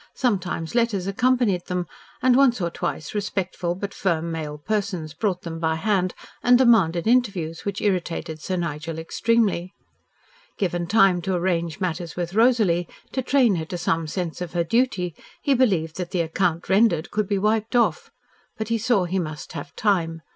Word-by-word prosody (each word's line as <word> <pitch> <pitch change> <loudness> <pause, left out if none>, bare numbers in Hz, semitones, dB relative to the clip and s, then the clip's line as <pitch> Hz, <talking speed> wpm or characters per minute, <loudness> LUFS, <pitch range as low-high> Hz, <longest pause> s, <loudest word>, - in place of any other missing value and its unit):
Sometimes 185 - -1
letters 230 -6 +1
accompanied 215 -2 +1
them, 180 -1 -1 0.4
and 255 -1 +5
once 260 -3 +4
or 170 -2 -1
twice 155 - -4
respectful 190 -4 -2
but 200 +2 -5
firm 170 -3 -1
male 155 -2 -4
persons 185 -2 -2
brought 185 +1 -1
them 165 -1 -5
by 160 -1 +1
hand 185 +1 0 0.3
and 245 0 +6
demanded 195 -10 +4
interviews 200 -9 +1
which 200 -1 -3
irritated 170 -5 -2
Sir 185 - -2
Nigel 165 -2 -3
extremely. 195 +1 0 0.8
Given 175 -3 -1
time 195 -3 +4
to 190 +1 -1
arrange 170 -2 -1
matters 175 -3 -3
with 175 0 -3
Rosalie, 215 -7 +3 0.2
to 260 - -1
train 250 -6 +3
her 160 - -3
to 175 - -5
some 165 -2 0
sense 175 +1 -4
of 175 -2 -5
her 170 -1 +1
duty, 190 -4 0 0.3
he 280 - +2
believed 185 -12 +1
that 180 -2 -3
the 180 -2 0
"acct. 170 0 0
rendered" 190 -5 +3
could 215 -1 0
be 200 - 0
wiped 215 +3 0
off, 460 - +2 0.5
but 220 0 -4
he 230 0 +1
saw 225 -4 +2
he 180 +2 -1
must 155 -3 -6
have 145 - -7
time. 165 -6 0
185 Hz, 170 wpm, -24 LUFS, 170-220 Hz, 0.8 s, and